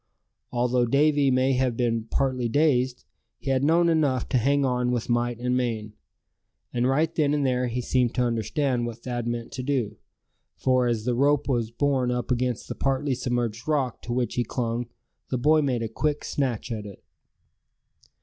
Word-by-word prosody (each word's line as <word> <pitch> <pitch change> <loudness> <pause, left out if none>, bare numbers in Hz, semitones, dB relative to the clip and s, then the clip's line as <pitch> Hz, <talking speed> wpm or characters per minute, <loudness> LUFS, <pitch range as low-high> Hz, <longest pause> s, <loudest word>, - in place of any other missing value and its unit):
Although 125 0 +1
Davy 145 +2 +3
may 130 +1 +3
have 125 -2 0
been 115 -2 0
partly 130 -1 0
dazed, 130 -3 +1 0.3
he 135 - -3
had 130 0 +1
known 170 +3 +4
enough 145 -7 +1
to 130 - +2
hang 140 +3 +2
on 125 -1 0
with 120 -2 -2
might 120 0 +1
and 125 +1 -1
main. 115 -4 -2 0.8
And 125 +1 +1
right 155 +5 +1
then 150 -2 +2
and 145 -2 0
there 125 -1 +1
he 120 +1 -2
seemed 125 -1 +1
to 125 - +2
understand 120 +2 0
what 115 0 -8
Thad 120 -2 -3
meant 120 -1 -3
to 130 - -5
do; 125 -6 -1 0.6
for 130 -1 +2
as 115 -2 -1
the 125 - +1
rope 145 +3 +2
was 120 -5 0
borne 130 +1 0
up 125 0 -2
against 125 -1 -1
the - - -4
partly 135 +1 0
submerged 120 -2 -2
rock 140 -6 0
to 120 - -7
which 120 0 0
he 125 - +1
clung, 120 0 -2 0.4
the 130 - 0
boy 155 +5 +4
made 125 -5 0
a - - -1
quick 150 +6 -2
snatch 125 -5 -2
at 105 -2 -4
it. 100 - -12
125 Hz, 185 wpm, -25 LUFS, 120-135 Hz, 0.8 s, known